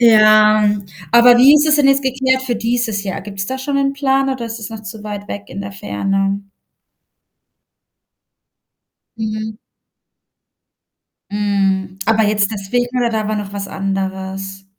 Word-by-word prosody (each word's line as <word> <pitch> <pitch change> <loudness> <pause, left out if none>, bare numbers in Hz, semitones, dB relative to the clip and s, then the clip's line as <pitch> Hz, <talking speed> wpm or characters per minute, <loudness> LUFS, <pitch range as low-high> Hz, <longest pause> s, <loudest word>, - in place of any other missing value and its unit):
Ja, 215 -2 +6 0.4
aber 240 +1 +7
wie 275 +4 +8
ist 300 +1 +4
es 300 0 +4
denn 285 -2 +3
jetzt 275 0 +3
geklärt 260 0 0
für 245 -3 -2
dieses 230 -3 -1
Jahr? 190 - -4
Gibt's 195 0 -6
da 260 - -3
schon 275 +1 -2
'n 275 0 +1
Plan 270 -1 +1
oder 250 -3 -4
ist 225 0 -6
es 220 +1 -8
noch 220 -1 -8
zu 210 0 -9
weit 205 -1 -6
weg 205 0 -6
in 200 - -7
der 200 0 -7
Ferne? 195 - -2 2.7
Mhm. 215 0 -4 1.7
Mhm, 195 -2 -1
aber 220 0 +3
jetzt 205 -1 +1
deswegen 245 +5 -2
oder 235 -2 0 0.2
war 215 - -1
da 210 - -3
noch 195 - -11
was 200 -1 -5
anderes? 195 0 -4
215 Hz, 150 wpm, -17 LUFS, 195-245 Hz, 2.7 s, wie